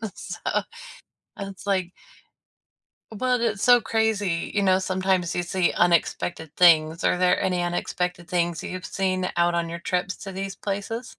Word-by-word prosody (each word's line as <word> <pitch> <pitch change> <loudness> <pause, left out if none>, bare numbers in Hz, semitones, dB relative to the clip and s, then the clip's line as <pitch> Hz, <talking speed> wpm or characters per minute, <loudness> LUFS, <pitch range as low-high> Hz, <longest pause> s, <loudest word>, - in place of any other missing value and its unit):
So - - -8 1.0
and 195 0 -5
it's 190 +1 -13
like 185 -3 0 1.2
well, 250 +3 0
that's 220 -4 -1
so 245 -1 +6
crazy, 220 -6 0
you 205 - +1
know, 185 -1 +4
sometimes 185 -2 0
you 175 - 0
see 175 0 0
unexpected 170 -2 0
things. 160 -2 +5
Are - - +2
there 180 0 +3
any 180 -1 0
unexpected 175 0 -2
things 175 -2 -1
you've 185 0 -6
seen 185 -1 -1
out 170 0 +2
on 170 -1 0
your 170 +1 -6
trips 180 +2 -2
to 195 - -8
these 195 +1 -5
places? 210 +4 -4
185 Hz, 155 wpm, -24 LUFS, 175-195 Hz, 1.2 s, so